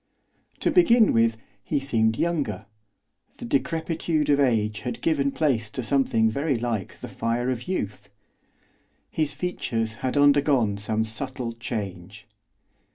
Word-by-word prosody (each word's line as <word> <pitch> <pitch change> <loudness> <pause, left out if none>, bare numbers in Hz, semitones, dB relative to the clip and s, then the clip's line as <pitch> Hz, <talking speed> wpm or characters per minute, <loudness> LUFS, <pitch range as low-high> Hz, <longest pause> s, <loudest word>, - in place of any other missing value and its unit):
To - - +2
begin 245 - +5
with, 115 0 +3 0.3
he 145 - 0
seemed 115 -5 +1
younger, 140 - -1 0.7
the - - -7
decrepitude 160 +2 0
of 140 - +3
age 110 -6 +1
had 125 -2 -5
given 140 -4 +1
place 125 -9 0
to 125 - -5
something 115 -3 +2
very 140 +4 0
like 115 -5 -4
the - - -6
fire 120 +2 -1
of 125 +3 -5
youth. 105 - -4 1.0
His 150 -2 -1
features 115 -9 -2
had 130 +2 -1
undergone 140 -7 +4
some 110 +2 -1
subtle 120 +1 -4
change. 100 -5 -6
125 Hz, 130 wpm, -25 LUFS, 110-145 Hz, 1.0 s, begin